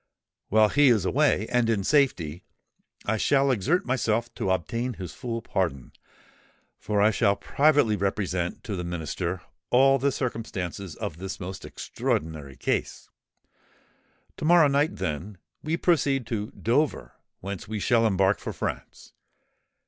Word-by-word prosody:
While 110 0 +5
he 145 +3 +4
is 110 -7 +4
away, 135 -1 +2
and 125 -2 +2
in 105 -4 +1
safety, 95 - +1 0.6
I 110 +2 0
shall 135 +4 +3
exert 135 - +1
myself 120 -2 0
to - - -3
obtain 115 +8 -1
his 90 -4 -7
full 115 -3 -5
pardon; 70 -10 -2 0.9
for 105 +1 -1
I 110 - +5
shall 100 -1 +2
privately 145 -3 +3
represent 95 -3 -2
to 105 - -4
the 90 - -4
Minister 85 +1 -3 0.3
all 135 +2 +5
the 140 +2 +2
circumstances 100 - -4
of 75 - -5
this 95 +2 -6
most 95 0 -7
extraordinary 75 -4 -3
case. - - -2 1.3
To - - -4
morrow 170 -2 +6
night, 140 0 +1
then, 95 +1 -4 0.2
we 160 +2 -1
proceed 140 -7 +2
to 105 -2 -3
Dover, 140 +6 -1 0.3
whence 100 +1 -6
we 110 0 -3
shall 115 +2 +3
embark 95 -1 +2
for - - -5
France. - - -6
110 Hz, 140 wpm, -26 LUFS, 95-130 Hz, 1.3 s, morrow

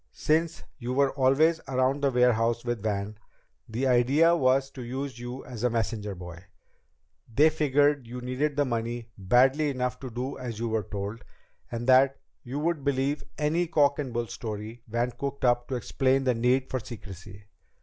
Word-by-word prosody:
Since 160 +1 0 0.2
you 125 0 -3
were 140 0 +3
always 145 +5 +3
around 130 +2 +1
the 140 - +3
warehouse 120 -2 +2
with 120 -3 -2
Van, 105 0 -3 0.5
the 120 +4 -2
idea 135 +7 +4
was 135 -2 +2
to 130 - -9
use 130 +1 -5
you 120 +2 -7
as 125 -3 -7
a 125 - +3
messenger 110 -3 -2
boy. 90 -1 -9 0.9
They 150 +7 +5
figured 145 -3 +2
you 125 +2 -6
needed 130 +4 -1
the 145 0 +2
money 120 -1 -3
badly 130 +10 +3
enough 125 -2 -2
to 130 - -6
do 125 +4 -5
as 120 -4 -5
you 115 +1 -2
were 110 -2 -1
told, 105 +3 -5 0.5
and 120 0 -4
that 130 +1 +5 0.2
you 135 0 -6
would 155 -1 -1
believe 140 +1 0
any 160 +3 +1
cock 145 -3 +3
and 135 -4 -3
bull 120 0 -1
story 110 +1 -6
Van 120 +2 -1
cooked 140 +1 -4
up 120 0 +2
to 130 - -3
explain 135 +2 +1
the 130 -1 +2
need 125 +3 +1
for 130 - 0
secrecy. 100 -3 -10
125 Hz, 175 wpm, -27 LUFS, 115-140 Hz, 0.9 s, They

